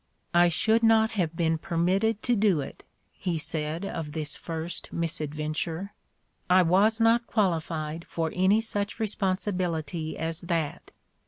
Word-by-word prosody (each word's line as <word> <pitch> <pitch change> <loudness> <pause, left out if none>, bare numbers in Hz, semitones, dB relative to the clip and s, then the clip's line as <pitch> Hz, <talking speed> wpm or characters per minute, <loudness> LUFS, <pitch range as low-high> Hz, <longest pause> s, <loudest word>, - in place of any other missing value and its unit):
"I 175 0 +6
should 220 +7 +3
not 225 0 +4
have 175 -7 -1
been 165 -1 +1
permitted 190 +7 0
to 245 - +2
do 200 -6 +3
it," 135 - -7 0.3
he 175 -3 -3
said 155 +3 -3
of 160 -6 -5
this 150 -2 -2
first 165 +1 -5
misadventure. 160 +3 -3 0.2
' - - -46
' - - -45
I 185 +1 +6
was 200 +6 +3
not 230 +1 +3
qualified 165 -5 -1
for 165 -1 -2
any 190 +4 +3
such 205 -1 -3
responsibility 185 -6 -2
as 160 +1 -3
that. 170 -4 -2
175 Hz, 145 wpm, -27 LUFS, 160-205 Hz, 0.3 s, I